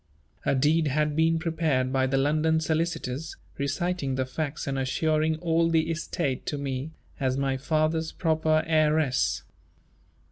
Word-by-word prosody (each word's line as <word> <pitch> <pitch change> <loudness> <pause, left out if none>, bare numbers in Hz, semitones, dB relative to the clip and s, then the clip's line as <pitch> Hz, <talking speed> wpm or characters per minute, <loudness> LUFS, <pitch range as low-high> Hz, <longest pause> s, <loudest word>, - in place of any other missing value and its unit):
A - - +3
deed 150 +4 +3
had 150 +1 0
been 165 +1 +3
prepared 160 -6 0
by 130 -1 +2
the 135 +1 +1
London 155 +3 +2
solicitors, 160 -2 -2 0.2
reciting 140 0 -1
the 130 0 0
facts 145 +3 -4
and 135 -1 -2
assuring 155 +4 +1
all 165 -1 +2
the 165 0 +2
estate 160 -4 -2
to 145 - -2
me, 135 +1 -3 0.3
as 130 -1 0
my 135 -1 0
father's 155 +3 0
proper 155 -2 +1
heiress. 155 -4 +2
155 Hz, 140 wpm, -27 LUFS, 135-160 Hz, 0.3 s, A